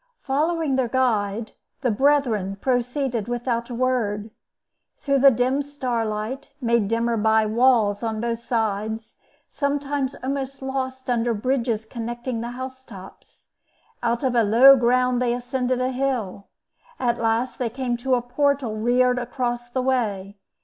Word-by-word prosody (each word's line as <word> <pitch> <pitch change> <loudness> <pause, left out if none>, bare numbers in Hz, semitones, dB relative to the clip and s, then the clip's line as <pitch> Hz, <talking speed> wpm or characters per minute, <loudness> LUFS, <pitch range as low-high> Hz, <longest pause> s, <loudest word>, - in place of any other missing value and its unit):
Following 300 0 0
their 260 -2 +1
guide, 225 -4 0 0.3
the 250 - +1
brethren 230 -6 +2
proceeded 250 -2 -1
without 240 0 -2
a 240 - -5
word. 225 -4 -1 0.7
Through 275 -1 +1
the 275 +1 +8
dim 255 +3 +1
starlight, 250 -3 -3
made 235 -5 +1
dimmer 230 +1 0
by 220 0 +3
the 215 - -3
walls 230 -4 +3
on 220 -2 -2
both 230 0 -2
sides, 220 -1 -3 0.3
sometimes 280 -1 -2
almost 270 0 -3
lost 260 -1 -4
under 240 -1 +1
bridges 230 -1 -1
connecting 240 +1 -4
the 235 - -4
house 260 0 -7
tops, 195 -6 -14 0.5
out 235 +1 0
of 260 -2 +1
a 235 - +4
low 240 +6 +8
ground 250 0 +2
they 240 -1 +1
ascended 250 0 -1
a 255 0 0
hill. 250 -7 -2 0.5
At 240 -1 0
last 230 +2 0
they 245 -2 0
came 250 0 -2
to 255 +2 +1
a 245 - -1
portal 270 -2 0
reared 245 +3 +2
across 240 -1 -3
the 255 +1 -2
way. 205 -6 -1
245 Hz, 145 wpm, -23 LUFS, 225-260 Hz, 0.7 s, the